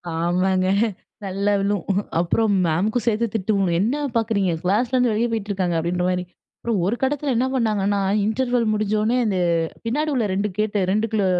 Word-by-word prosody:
ஆமாங்க. 185 +2 +1 0.6
நல்லா 200 +2 0
விழும் 200 -1 -1 0.3
அப்புறம் 210 +5 +1
மேமுக்கும் 205 +9 0
சேர்த்து 230 +1 +2
திட்டுங்க 195 -3 +1
என்ன 235 +7 +1 0.2
பார்க்குறீங்க 215 -5 +1
கிளாஸ்லருந்து 240 +5 +2
வெளியே 230 +2 0
போயிட்டு 215 -2 -3
இருக்காங்க 180 -4 0
அப்டின்ற 175 +2 -1
மாரி 180 0 -1 0.4
அப்புறம் 230 -5 -1
ஒரு 215 +5 +1
கட்டத்தில 275 0 0
என்ன 250 +3 +2
பண்ணாங்கன்னா, 205 -5 +1 0.3
இன்டர்வெல் 245 +1 0
முடிஞ்சோனே 215 +3 +1
அந்த 195 -3 0 0.5
பின்னாடி 300 +7 0
உள்ள 240 -5 +1
2 200 +2 0
கேட் 215 0 -1 0.2
2 215 -1 0
210 Hz, 145 wpm, -22 LUFS, 190-230 Hz, 0.6 s, சேர்த்து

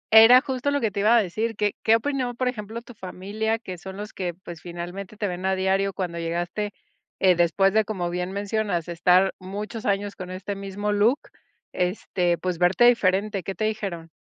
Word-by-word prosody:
Era 230 +3 +10
justo 265 0 -2
lo 285 0 +1
que 225 -5 0
te 200 - -4
iba 215 +4 +5
a 225 - +4
decir. 220 +5 -2
¿Qué 205 0 0
qué 220 - +5
opinó, 250 0 -1
por 255 +1 -1
ejemplo, 230 -1 -4
tu 245 - -12
familia, 205 +3 -3
que 185 -6 -8
son 190 +2 -8
los 210 +1 -7
que, 180 -3 -3
pues, 175 -2 -10
finalmente 175 +4 -7
te 205 - -1
ven 180 -1 -5
a 190 0 +1
diario, 190 +1 +1
cuando 180 -3 -4
llegaste, 175 +5 -2 0.5
eh, 185 -1 +5
después 175 +3 +3
de, 220 0 +4
como 185 -5 -3
bien 180 +1 -3
mencionas, 200 -3 -1
estar 180 +3 +3
muchos 210 +5 -6
años 200 0 0
con 185 -2 -7
este 185 +2 -5
mismo 200 +1 -3
look, 210 +6 +3 0.5
este, 180 -1 0
pues, 180 -2 -3
verte 180 +4 +4
diferente, 200 -3 +3
qué 190 +3 -5
te 215 - -1
dijeron? 195 -7 -3
195 Hz, 200 wpm, -25 LUFS, 180-220 Hz, 0.5 s, Era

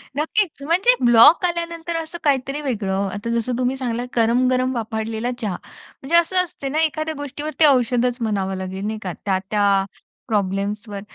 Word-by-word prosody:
नक्कीच 320 +1 -1
म्हणजे 370 - +3
ब्लॉक 240 +9 +7
आल्यानंतर 335 -1 -3
असं 325 +1 -6
काहीतरी 275 0 0
वेगळं. 200 -7 -1
आता 205 +3 -5
जसं 235 +1 -1
तुम्ही 255 +1 0
सांगितलं 245 -1 -3
गरम-गरम 255 +2 +2
वाफाळलेला 225 +1 -3
चहा. 205 -5 -2 0.5
म्हणजे 295 +6 -1
असं 365 +2 +4
असते 280 -5 -7
ना 300 +3 -1
एखाद्या 310 0 -1
गोष्टीवर 290 +2 -5
ते 310 - +7
औषधच 250 -2 +3
म्हणावं 195 -3 -1
लागेल 190 +1 -5
नाही 215 0 -3
का 180 - -4
त्या-त्या 200 +1 0 0.6
प्रॉब्लेम्सवर 205 0 -2
245 Hz, 150 wpm, -21 LUFS, 210-300 Hz, 0.6 s, ब्लॉक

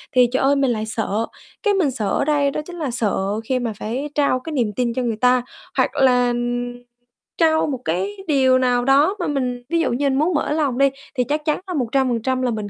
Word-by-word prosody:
thì 250 -1 +6
trời 260 - 0
ơi, 275 +1 +4
mình 275 -2 +2
lại 215 -2 -2
sợ. 220 0 -1 0.4
Cái 415 -2 +3
mình 355 -8 +2
sợ 215 -5 -2
ở 280 - 0
đây 285 -2 +2
đó 300 - -3
chính 355 - -9
là 290 -6 -2
sợ 230 -4 0 0.3
khi 260 -1 +1
mà 235 -3 -3
phải 255 +7 -3
trao 280 -3 +2
cái 320 +4 -7
niềm 235 -7 0
tin 240 0 0
cho 255 - -1
người 230 -3 -1
ta 250 0 +4 0.4
hoặc - - +3
là 250 -2 +3 1.0
trao 315 -2 +3
một 270 -4 -3
cái 290 - -2
điều 260 -4 +4
nào 245 -1 +1
đó 285 +8 +4
mà 350 - -1
mình 255 -4 -2
ví 335 0 +1
dụ 330 - +1
như 280 +3 +1
mình 265 0 +1
muốn 330 +5 +2
mở 300 - 0
lòng 290 -5 0
đi, 275 +1 +4 0.3
thì 250 - +2
chắc 300 +4 -2
chắn 305 - +1
là 365 - -4
100% 255 -2 0
là 250 -1 0
mình 215 -2 -4
260 Hz, 235 wpm, -21 LUFS, 245-295 Hz, 1.0 s, thì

